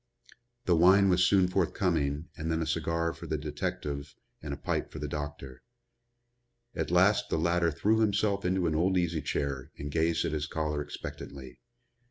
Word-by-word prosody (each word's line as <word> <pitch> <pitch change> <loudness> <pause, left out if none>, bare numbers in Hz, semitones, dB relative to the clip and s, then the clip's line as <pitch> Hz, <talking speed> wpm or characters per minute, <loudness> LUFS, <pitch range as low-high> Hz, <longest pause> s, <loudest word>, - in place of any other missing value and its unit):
The 90 -4 +4
wine 95 +4 +6
was 90 0 +4
soon 95 0 +4
forthcoming 85 -5 0
and 80 +1 -3
then 80 - 0
a 80 - -1
cigar 80 +1 -1
for - - -10
the 80 - -1
detective 75 -1 -4 0.3
and - - -6
a - - -4
pipe - - -2
for - - -8
the 75 - -4
doctor. 75 -3 -6 1.1
At - - -2
last 95 +4 +3
the - - 0
latter 85 +1 +2
threw 105 +8 +1
himself 100 -2 +1
into 90 0 +1
an 80 - +1
old 90 +4 +2
easy 85 -3 0
chair 70 -1 -3
and 70 0 -5
gazed 80 +1 +1
at - - -1
his 75 -1 -2
caller 75 -1 -2
expectantly. 65 -3 -8
80 Hz, 175 wpm, -29 LUFS, 75-90 Hz, 1.1 s, wine